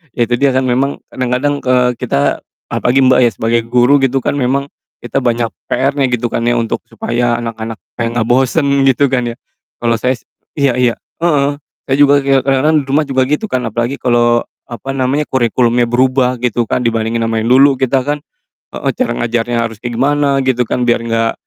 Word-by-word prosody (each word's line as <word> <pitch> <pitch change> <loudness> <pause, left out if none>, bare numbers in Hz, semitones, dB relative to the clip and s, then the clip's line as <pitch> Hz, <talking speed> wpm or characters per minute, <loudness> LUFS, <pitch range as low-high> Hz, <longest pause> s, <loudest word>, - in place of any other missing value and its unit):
iya 120 - +2
itu 120 - +1
dia 140 +2 +2
kan 130 0 0
memang 135 +3 0
kadang-kadang, 130 +3 -2
eee, 125 -1 +2
kita, 75 - -1 0.2
apalagi 125 +2 +1
Mbak 130 0 +4
ya, 120 - +4
sebagai 115 +2 0
guru 130 +3 +4
gitu 135 +1 +2
kan 135 - -2
memang, 140 +1 0 0.3
kita 125 +2 -3
banyak 120 -1 +1 0.2
PR-nya 135 -1 +1
gitu 120 0 0
kan 115 - -3
ya 120 0 +1
untuk 115 - -3
supaya 120 0 -2
anak-anak 115 -3 -6 0.2
kayak 115 0 -2
gak 110 - -1
bosen 135 +2 +2
gitu 135 +1 +3
kan 125 -2 -1
ya, - - -10 0.4
kalo 115 -1 +1
saya 125 +3 0
s - - -32 0.3
iya 135 -3 +2
iya, 125 -2 +1 0.2
heeh, 145 -4 +2 0.3
saya 135 - +1
juga 145 0 +5
kayak 135 -1 +2
kadang-kadang 140 +4 +2
di - - -14
rumah 150 +1 +2
juga 130 -1 +1
gitu 150 +9 0
kan, 130 -7 -1
apalagi 120 +4 -2
kalo 120 -2 +2 0.2
apa 120 +2 -8
namanya, 135 +3 0
kurikulumnya 120 -1 +2
berubah 130 +1 +2
gitu 120 -1 0
kan, 125 - -1
dibandingin 115 0 -1
sama 115 0 -1
yang 110 - -2
dulu 135 0 +5
kita 130 0 +1
kan 145 +1 -2 0.5
heeh, - - -2
cara 255 - -1
ngajarnya 120 0 -1
harusnya 115 +2 -7
gimana 140 +3 +1
gitu 125 -1 +2
kan 125 +1 -2
biar 120 -1 +2
gak 115 0 +1
125 Hz, 195 wpm, -14 LUFS, 120-135 Hz, 0.5 s, juga